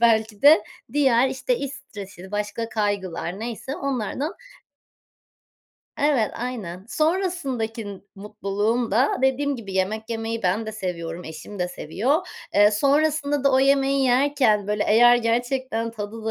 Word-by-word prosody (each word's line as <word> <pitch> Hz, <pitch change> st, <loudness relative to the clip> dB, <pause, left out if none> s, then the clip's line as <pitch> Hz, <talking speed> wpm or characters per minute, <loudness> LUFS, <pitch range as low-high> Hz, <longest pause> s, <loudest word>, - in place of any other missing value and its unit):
belki 220 Hz, -2 st, +2 dB
de 290 Hz, -7 st, +8 dB, 0.3 s
diğer, 265 Hz, -3 st, +4 dB
işte, 480 Hz, -, -1 dB
iş 280 Hz, -1 st, -4 dB
stresiydi, 200 Hz, -8 st, -10 dB
başka 210 Hz, +2 st, -3 dB
kaygılar 200 Hz, -4 st, -2 dB
neyse 240 Hz, +4 st, -5 dB
onlardan 275 Hz, -, -2 dB, 1.6 s
Evet, 280 Hz, -7 st, +2 dB
aynen. 210 Hz, -6 st, -5 dB
Sonrasındaki 265 Hz, -, -2 dB
mutluluğum 210 Hz, +3 st, -2 dB
da, 245 Hz, +8 st, +2 dB
dediğim 275 Hz, +1 st, +1 dB
gibi, 205 Hz, -5 st, -8 dB
yemek 215 Hz, +4 st, -1 dB
yemeyi 225 Hz, 0 st, -3 dB
ben 190 Hz, +5 st, 0 dB
de 220 Hz, -, -4 dB
seviyorum, 175 Hz, -4 st, -5 dB
eşim 160 Hz, +6 st, -9 dB
de 180 Hz, 0 st, -1 dB
seviyor. 260 Hz, -, -1 dB, 0.3 s
Eee, 205 Hz, +1 st, +6 dB
sonrasında 285 Hz, +4 st, +1 dB
da 275 Hz, -, +4 dB
o 260 Hz, -, +5 dB
yemeği 275 Hz, 0 st, +3 dB
yerken 250 Hz, -5 st, +3 dB
böyle, 210 Hz, 0 st, 0 dB
eğer 240 Hz, +3 st, +7 dB
gerçekten 240 Hz, 0 st, -1 dB
tadı 220 Hz, 0 st, -7 dB
da 225 Hz, -, -1 dB
230 Hz, 135 wpm, -23 LUFS, 205-270 Hz, 1.6 s, de